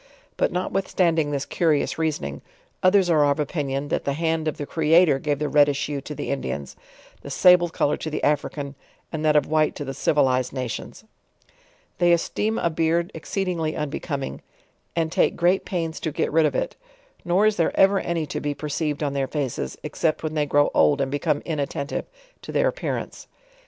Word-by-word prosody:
But - - +1
notwithstanding 180 -3 0
this 140 -1 -2
curious 160 -2 0
reasoning, 70 - -2 0.4
others 185 0 +4
are 160 -4 +4
of 140 - 0
opinion, 145 -2 -2
that - - -1
the 140 - -1
hand 160 +1 -1
of 155 - -2
tho 145 - -4
Creator 160 -1 +4
gave 145 0 -1
the 150 +1 -1
reddish 145 -1 +3
hue 145 -2 -3
to 150 +2 -7
the - - -4
Indians, 70 - -4 0.5
the - - -9
sable 180 -1 +5
color 150 -2 0
to 160 - -5
the 155 - -4
African, 145 -1 -1 0.4
and 155 -1 -4
that 155 -1 +3
of 150 - +4
white 155 0 +1
to 145 - -5
the 135 - -4
civilized 130 -2 +2
na 130 -2 -2
tions. 120 - -7 1.0
They 175 -1 +5
esteem 210 +6 0
a 170 - 0
beard 165 +3 +1
exceedingly 175 -5 -2
unbecoming, 140 - -4 0.5
and 165 -1 0
take - - +2
great 180 +2 +2
pains 165 -4 -3
to 160 - -3
get - - -1
rid 160 0 +4
of - - -3
it; - - -2 0.5
nor 180 +4 +2
is 215 -1 +2
there 165 - 0
ever 195 0 +5
any 170 -3 -2
to - - -4
be 145 -1 -2
per 150 - -6
ceived 150 0 -2
on 140 -1 -1
their 135 -1 -1
faces, 135 - -3
except 160 -2 -1
when 155 -1 -2
they 150 -1 0
grow 145 0 +3
old 145 -1 +4
and 135 -1 -1
.become 145 +1 0
inattentive 145 -2 -3 0.4
to - - -8
their - - +2
appearance. - - -4
155 Hz, 190 wpm, -24 LUFS, 145-170 Hz, 1.0 s, sable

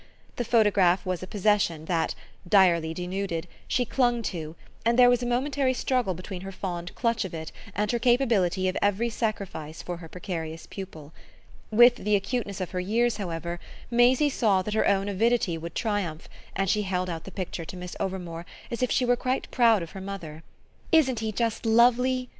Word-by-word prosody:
The 245 - 0
photograph 205 -6 +3
was 185 -2 -2
a 185 - -6
possession 195 -6 +1
that, 165 -1 0 0.3
direly 175 -5 +4
denuded, 180 0 -3 0.2
she 245 - +1
clung 240 -2 +1
to, 160 -2 -6 0.3
and 235 +1 +2
there 245 -1 +7
was 245 0 +2
a 245 - -2
momentary 260 +1 +1
struggle 245 -8 0
between 185 +1 -7
her 195 +1 -6
fond 180 -2 -5
clutch 230 -2 0
of 185 -3 -6
it 160 0 -6 0.2
and 210 0 0
her 240 - 0
capability 225 -7 +2
of 185 - -1
every 205 +4 +1
sacrifice 195 -9 -4
for 175 -1 -5
her 165 -2 -11
precarious 165 -3 -5
pupil. 160 -6 -9 0.6
With 240 +3 +6
the 210 -2 +1
acuteness 200 0 -2
of 185 - -4
her 185 - -2
years, 225 +5 +1
however, 170 -3 -4 0.3
Maisie 250 +5 +4
saw 200 -7 +2
that 210 - -4
her 220 - +2
own 195 0 +2
avidity 215 -2 +1
would 165 +1 -7
triumph, 200 -8 -2 0.3
and 195 0 0
she 210 +3 +2
held 185 -2 -1
out 165 -2 -5
the - - -7
picture 180 -2 -5
to 185 - -8
Miss 180 0 -7
Overmore 175 -3 -4 0.3
as 235 - -3
if 250 - +2
she 255 - +2
were 245 0 +4
quite 255 +2 -2
proud 230 -6 +4
of 165 - -9
her 190 - -8
mother. 180 -6 -7 0.5
"Isn't 270 -8 +4
he 220 -1 -2
just 230 +1 -1
lovely?" 250 +3 +3
200 Hz, 190 wpm, -27 LUFS, 175-235 Hz, 0.6 s, there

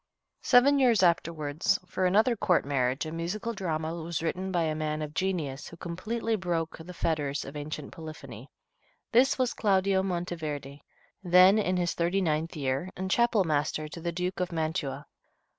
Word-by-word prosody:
Seven 275 +3 +5
years 235 -7 +4
afterward, 165 -3 0 0.2
for 185 0 0
another 220 +6 +3
court 195 -8 +2
marriage, 135 -1 0
a 155 - -5
musical 180 +8 -3
drama 160 -5 -2
was 165 -1 -4
written 185 +3 -2
by 175 -2 +1
a 155 -1 0
man 155 0 -2
of 150 0 -6
genius 160 -7 -2
who 170 - -11
completely 220 +7 -2
broke 170 -5 -2
the 165 +3 -9
fetters 150 -5 -1
of 135 - -9
ancient 150 0 -6
polyphony. 140 -7 -10 0.6
This 255 +3 +4
was 255 -2 +1
Claudio 195 -2 +2
Monteverde, 160 -6 -4 0.4
then 185 +3 +6
in 185 -3 0
his 175 -1 0
thirty 175 +3 0
ninth 160 -2 -1
year, 135 +4 -2
and 190 +1 -3
chapel 235 -3 +3
master 155 -1 -1
to 165 - -8
the 170 +1 -2
Duke 180 +2 -3
of 180 -1 -1
Mantua. 155 -4 -2
170 Hz, 165 wpm, -28 LUFS, 155-190 Hz, 0.6 s, then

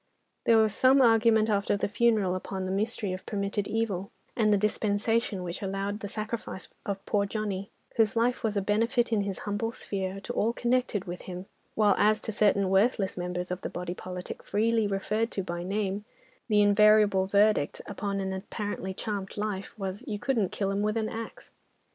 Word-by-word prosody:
There 230 - +6
was 220 -2 +4
some 260 +4 +5
argument 225 -3 +5
after 200 -1 +1
the - - 0
funeral 210 -3 +2
upon 185 0 -4
the 185 - -2
mystery 205 -1 -1
of 185 - -6
permitted 200 0 -2
evil, 205 -4 -1 0.3
and 215 -3 +3
the 205 - +5
dispensation 210 0 0
which 175 -1 -5
allowed 195 +1 -2
the 205 - -5
sacrifice 215 -2 -5 0.2
of 195 -1 -3
poor 200 -1 +1
Johnny, 200 -2 -3 0.3
whose 225 -1 +3
life 240 +2 +1
was 215 -2 0
a 200 - +1
benefit 230 +4 +1
in 210 - +3
his 195 -2 -3
humble 205 +2 -1
sphere, 195 -3 -4
to 245 - -5
all 230 0 +1
connected 240 -5 0
with 175 -1 -6
him, 180 +1 -6 0.3
while 210 -2 +4
as 215 +1 +4
to 220 - -3
certain 200 -2 +2
worthless 195 0 +2
members 180 0 -3
of 180 - -3
the - - -4
body 175 0 -4
politic, 180 0 -7
freely 225 +1 +1
referred 210 +3 -1
to 195 - -2
by 175 -1 -4
name, 200 +2 -2 0.4
the 210 -2 +4
invariable 205 -2 +5
verdict 205 -6 +3
upon 200 0 -3
an 190 0 -2
apparently 190 -1 -4
charmed 205 -2 -4
life 205 0 -3
was, 195 -1 -4
"You 210 - -2
couldn't 220 -4 0
kill 195 -1 -1
'em 200 +1 0
with 210 +1 0
an 220 -1 -1
axe." 225 0 -7
205 Hz, 185 wpm, -28 LUFS, 195-220 Hz, 0.4 s, There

